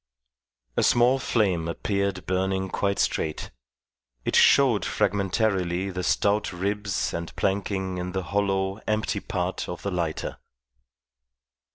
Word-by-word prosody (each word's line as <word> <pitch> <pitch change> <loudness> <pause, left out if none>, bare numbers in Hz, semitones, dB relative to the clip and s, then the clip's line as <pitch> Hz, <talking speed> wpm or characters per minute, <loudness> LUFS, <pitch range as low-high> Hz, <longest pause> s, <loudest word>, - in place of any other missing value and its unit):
A - - +4
small 125 +2 +4
flame 95 -10 +1
appeared 100 +1 -2
burning 95 +1 0
quite 100 +1 0
straight. 75 - -1 0.7
It - - 0
showed 130 -7 +5
fragmentarily 95 -2 0
the 90 0 -3
stout 100 +3 +1
ribs 100 +2 -2
and 85 0 -5
planking 95 -1 -1
in 90 +1 -3
the 95 0 -2
hollow, 95 +1 0
empty 110 0 0
part 95 -4 -3
of 90 - -6
the 100 - -2
lighter. 85 -3 -2
95 Hz, 120 wpm, -26 LUFS, 90-100 Hz, 0.7 s, showed